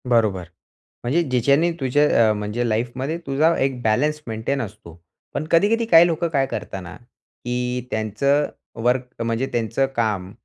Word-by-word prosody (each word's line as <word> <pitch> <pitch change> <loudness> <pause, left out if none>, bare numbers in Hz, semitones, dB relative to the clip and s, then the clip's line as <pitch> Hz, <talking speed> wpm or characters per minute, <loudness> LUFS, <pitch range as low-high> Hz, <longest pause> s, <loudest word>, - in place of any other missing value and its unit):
बरोबर. 110 -6 +2 0.6
म्हणजे 140 +8 +2
ज्याच्याने 140 +5 +2
तुझ्या 130 -4 +3
अ, - - +3
म्हणजे 105 +3 -2
लाईफमध्ये 125 +7 -2
तुझा 155 +5 +3
एक 135 -2 -1
बॅलन्स 150 +8 +1
मेंटेन 115 +5 -2
असतो. 95 -7 -10 0.3
पण 155 - -2
कधी-कधी 210 +7 +3
काही 170 -6 +7
लोकं 170 0 0
काय 140 -4 +1
करतात 95 -7 -5
ना, 90 +1 -9 0.5
की 125 0 -2
त्यांचं 125 +7 +1 0.3
वर्क 125 +2 0 0.2
म्हणजे 115 +3 -1
त्यांचं 115 +3 0
काम 105 -5 -1
125 Hz, 145 wpm, -22 LUFS, 110-145 Hz, 0.6 s, काही